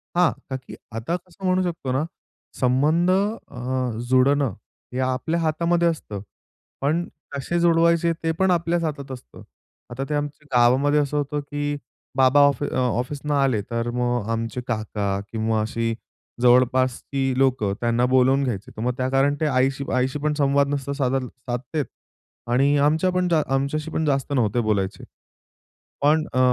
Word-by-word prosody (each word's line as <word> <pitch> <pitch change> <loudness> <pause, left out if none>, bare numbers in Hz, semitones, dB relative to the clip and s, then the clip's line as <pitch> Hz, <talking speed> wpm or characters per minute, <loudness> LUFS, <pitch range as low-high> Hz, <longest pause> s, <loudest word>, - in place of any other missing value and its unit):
हां, 175 -2 +4 0.2
का 130 - -2
की 130 - -11 0.2
आता 115 +10 -2
कसं 180 +1 -9
म्हणू 185 0 +3
शकतो 165 -7 -3
ना 135 +4 +1 0.6
संबंध 150 +8 +3
अ, 130 - -1 0.2
जोडणं 130 -2 +3 0.4
हे 130 - -2
आपल्या 130 +6 0
हातामध्ये 170 +2 +1
असतं, 110 -11 -3 0.6
पण 160 +5 0 0.2
कसे 140 +5 -2
जुडवायचे? 170 0 +3
ते 165 - +1
पण 190 -1 +3
आपल्याच 170 0 +1
हातात 140 -4 -4
असतं. 125 - -10 0.5
आता 130 +3 -3
ते - - -1
आमच्या 145 0 -4
गावामध्ये 135 +5 +4
असं 145 0 0
होतं 145 +1 -1
की 145 0 -3 0.4
बाबा 130 +2 +5
ऑफ 140 -3 0
अ - - -3
ऑफिसन 130 +4 -1
आले 135 -7 +2
तर 115 0 -1
मग 120 -3 -1
आमचे 115 +2 -2
काका 105 -3 -2
किंवा 110 -1 0
अशी 115 +1 -1 0.5
जवळपासची 130 +2 +2
लोकं 130 -7 +2
त्यांना 120 +1 +2
बोलावून 130 +2 +3
घ्यायचे, 105 -7 -3
तर 110 - -8
मग 125 +1 0
त्या 130 0 0
कारण 135 +2 +2
ते - - +2
आईशी 135 0 +1
आईशी 130 +3 0
पण 150 +1 0
संवाद 140 0 +3
नसतात 140 0 -2
साध 135 -2 0
साधते 125 +4 -4 0.7
आणि 135 +4 +3
आमच्या 155 +5 +3
पण 180 0 +1
जा 160 -2 +3
आमच्याशी 150 +4 -2
पण 160 - -1
जास्त 140 0 0
नव्हते 120 -3 +1
बोलायचे. 100 -3 -1 1.0
पण 155 +2 +3
अ, 130 - +1
135 Hz, 155 wpm, -23 LUFS, 125-150 Hz, 1.0 s, बाबा